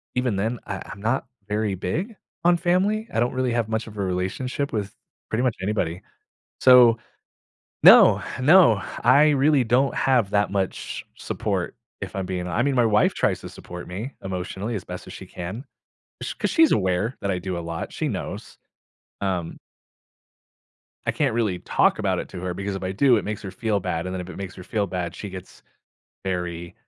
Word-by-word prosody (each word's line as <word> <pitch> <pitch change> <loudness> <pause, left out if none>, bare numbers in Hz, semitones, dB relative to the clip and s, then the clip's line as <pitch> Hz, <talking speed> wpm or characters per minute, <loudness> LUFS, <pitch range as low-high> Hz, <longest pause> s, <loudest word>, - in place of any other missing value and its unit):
even 125 -4 +1
then, 110 +5 -1
I - - -5
I'm 100 - -9
not 115 +5 0 0.2
very 105 -1 -1
big 170 - -3 0.3
on 175 0 +5
family. 195 +6 +1
I - - +1
don't 120 +1 +1
really 130 -1 0
have 115 -2 0
much 110 0 -1
of 105 -2 -11
a 100 - -1
relationship 95 +10 -2
with 105 -3 -3 0.3
pretty 110 +3 0
much 125 -4 0
anybody. 95 -4 -1 0.6
So 125 -3 +7 0.9
no, - - +9 0.2
no, 150 - +6 0.2
I 150 +2 +6
really 140 -1 +4
don't 125 +4 +2
have 125 -7 +2
that 105 -1 +2
much 95 -2 -3
support - - -3 0.2
if - - -5
I'm 95 -1 -2
being 90 -1 -3
I 90 +6 0
mean, 140 0 +1
my 120 -2 +4
wife 105 -1 +3
tries - - 0
to - - -7
support 90 0 -9
me 105 +10 -6
emotionally 95 +4 -4
as 100 - -4
best - - -8
as - - -9
she - - -9
can. 95 +8 -6 0.6
Sh - - -3
'Cause - - -1
she's 325 -2 +5
aware 95 +5 +1
that 100 - -1
I 95 - 0
do 90 -1 -4
a - - -3
lot, 85 -1 -5
she - - -2
knows. - - -5 0.6
Um 90 -4 -2 1.5
I - - +2
can't - - 0
really 105 -6 0
talk - - +2
about - - 0
it - - -5
to 90 - -7
her 90 -1 -3
because 100 +2 -4
if 95 - -7
I 95 0 -2
do, 120 +4 +4
it - - -1
makes 105 -1 -4
her 100 - -6
feel 110 0 -1
bad, 85 -1 -2
and 90 - -4
then 95 - -3
if 90 0 -7
it 85 - -9
makes 95 -1 -6
her 95 - -10
feel 105 +1 -1
bad, 90 -2 -4
she 105 - -6
gets 95 -1 -10 0.6
very, 90 -2 -3
105 Hz, 195 wpm, -24 LUFS, 95-125 Hz, 1.5 s, no